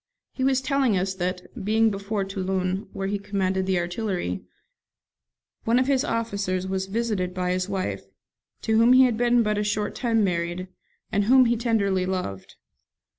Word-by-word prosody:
He 260 - -4
was 265 0 +2
telling 270 -6 +1
us 190 +1 -1
that, 185 +4 -5
being 220 +2 +3
before 200 +1 -2
Toulon, 190 0 -2
where 195 - -4
he 200 +1 -2
commanded 190 -2 -1
the 190 -1 +2
artillery, 175 - -2 1.2
one 230 +2 +2
of 255 - +3
his 270 0 +2
officers 200 -7 -2
was 190 0 -2
visited 200 -4 -2
by 180 -1 -1
his 185 +1 -1
wife, 190 -2 -3 0.6
to 220 -1 +2
whom 235 +2 +6
he 260 +1 +7
had 245 -3 +3
been 240 +1 +3
but 210 -1 0
a - - 0
short 210 0 -1
time 230 -3 +1
married, 175 0 -2 0.4
and 205 0 +1
whom 255 +3 +6
he 235 0 +2
tenderly 200 -6 +1
loved. 180 - -4
200 Hz, 170 wpm, -25 LUFS, 185-230 Hz, 1.2 s, he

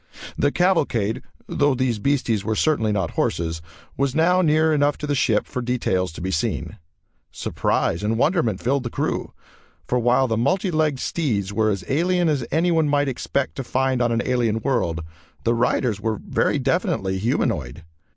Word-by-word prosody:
The 145 - +1
cavalcade 145 - +1 0.2
though 145 -2 +1
these 125 -4 0
beasties 120 -5 0
were 110 +1 -1
certainly 115 -6 +1
not 95 -5 -1
horses 80 -1 -1 0.4
was 140 -1 0
now 180 +3 +4
near 155 -1 +3
enough 145 -1 +2
to - - -5
the 145 - 0
ship 120 -6 +2
for 125 - -4
details 105 -8 -1
to - - -8
be 95 +2 -2
seen. 85 - -2 0.5
Surprise 85 - -1
and 110 +2 0
wonderment 130 - +1
filled 135 +3 +1
the 120 - -4
crew, - - -2 0.5
for 125 - 0
while 125 +3 +3
the 110 -2 0
multi 180 - +1
legged 155 -4 +1
steeds 105 - -1
were 110 0 +2
as 100 -3 -2
alien 175 +4 +2
as 145 -5 0
anyone 165 -2 +2
might 145 -1 +2
expect 135 +1 -2
to 135 - -3
find 130 0 0
on 120 -1 +2
an 115 0 0
alien 120 -3 +1
world, 85 - -1 0.4
the 115 - +2
riders 115 -2 0
were 110 -1 -1
very - - +1
definitely 95 0 0
humanoid. 80 - -1
125 Hz, 170 wpm, -22 LUFS, 105-145 Hz, 0.5 s, now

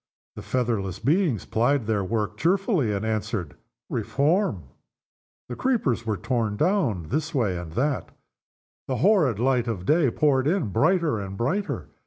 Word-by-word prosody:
The - - -7
featherless 110 -7 -1
beings 145 - +1
plied 120 +2 +1
their 105 -2 0
work 105 +1 -2
cheerfully, 175 - +1
and 100 +1 -2
answered, 110 -6 -2 0.3
"Reform!" 145 - 0 0.8
The 120 - -5
creepers 130 - 0
were 105 -2 0
torn 110 0 -1
down 140 - 0
this 155 +3 -2
way 110 -9 +1
and 85 -2 -6
that. 140 +4 -1 0.8
The 130 - -1
horrid 170 - +4
daylight 125 - +1
poured 140 -3 +2
in 165 - +1
brighter 155 - +2
and 95 -1 -6
brighter. 185 - -2
125 Hz, 135 wpm, -25 LUFS, 105-155 Hz, 0.8 s, horrid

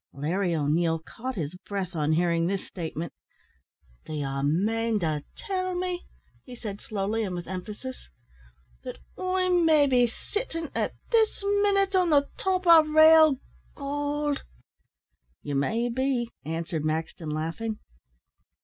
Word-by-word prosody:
Larry 170 +5 0
O'Neil 160 +2 +1
caught 240 +10 -7
his 160 -4 -3
breath 190 -1 -5
on 155 0 +1
hearing 170 0 +2
this 195 0 -2
statement. 165 -1 -5 0.9
"D'ye 140 -3 -3
mane 215 +10 +1
to 155 -3 -1
tell 370 -3 -2
me," 360 0 -3 0.4
he 250 - -10
said, 210 -4 -7
slowly 210 +2 -2
and 185 -4 -3
with 175 0 -5
emphasis, 210 +8 -7 0.7
"that - - -6 0.2
I'm 370 -1 +1
maybe 285 -6 +5
sittin' 330 - -5
at - - -1 0.2
this 445 -3 +2
minute 400 -1 +2
on 365 -2 +3
the 285 -2 +4
top 370 -1 0
o' 335 -2 +9
rale 315 -1 +7 0.4
goold?" 290 0 -2 1.0
"You 145 - -4
may 220 +13 +1
be," 245 -1 -1
answered 165 0 -3
Maxton, 160 +1 -2
laughing. 165 +9 -3
225 Hz, 125 wpm, -27 LUFS, -, 1.0 s, o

